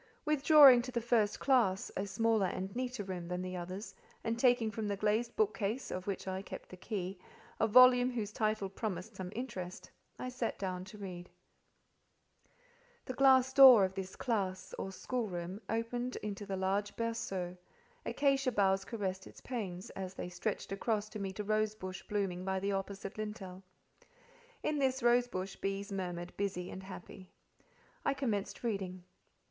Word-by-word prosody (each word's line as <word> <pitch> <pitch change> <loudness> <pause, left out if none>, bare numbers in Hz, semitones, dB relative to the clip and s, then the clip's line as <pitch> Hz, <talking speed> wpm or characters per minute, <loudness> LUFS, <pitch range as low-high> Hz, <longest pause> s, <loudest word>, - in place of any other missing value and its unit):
Withdrawing 295 -4 +8
to 255 +1 -6
the 240 - 0
first 225 -3 +2
classe, 235 -9 +2
a 195 - -2
smaller 225 -1 +2
and 190 +3 -4
neater 250 -3 -2
room 180 -3 -5
than 180 +1 -3
the 185 0 -4
others, 185 +4 -6 0.3
and 230 +1 -1
taking 245 -3 +4
from 215 0 -3
the 200 -1 -1
glazed 215 +4 0
bookcase, 215 +3 0
of 185 +1 -4
which 195 -1 -3
I 190 0 -2
kept 195 - -9
the - - -9
key, 185 -1 -4 0.4
a 220 - +3
volume 250 +2 +7
whose 225 -5 -3
title 215 -2 0
promised 195 0 -5
some 185 -1 -6
interest, 185 -7 -6 0.3
I 255 - -4
sat 250 -2 -3
down 185 -2 -3
to 190 +3 -11
read. 180 -3 -7 1.8
The 255 - -4
glass 260 0 +5
door 260 -7 +10
of 190 - -4
this 190 -1 -5
"classe," 195 -6 -2
or 190 - -3
schoolroom, 190 -4 -4
opened 240 +2 -2
into 205 -1 -5
the 195 -1 -2
large 195 +2 0
berceau; 195 -6 -3 0.5
acacia 275 -2 +2
boughs 195 -3 +2
caressed 190 -4 -4
its - - -13
panes, 195 -7 -5
as 190 -1 -6
they 180 - -5
stretched 185 +3 -3
across 210 +1 -1
to 215 - -7
meet 195 0 -5
a - - 0
rose 215 +1 +1
bush 185 -2 -6
blooming 195 -3 -1
by 190 0 -1
the 200 +1 -1
opposite 195 +1 -4
lintel: 195 -4 -6 1.0
in 300 -1 0
this 265 -1 +1
rose 240 +1 +4
bush 190 -4 -5
bees 195 +1 -3
murmured 180 -2 -4
busy 190 -3 -2
and 190 - -7
happy. 190 0 -10 0.7
I 280 - +1
commenced 220 -8 -2
reading. 190 -5 -3
205 Hz, 165 wpm, -34 LUFS, 190-235 Hz, 1.8 s, door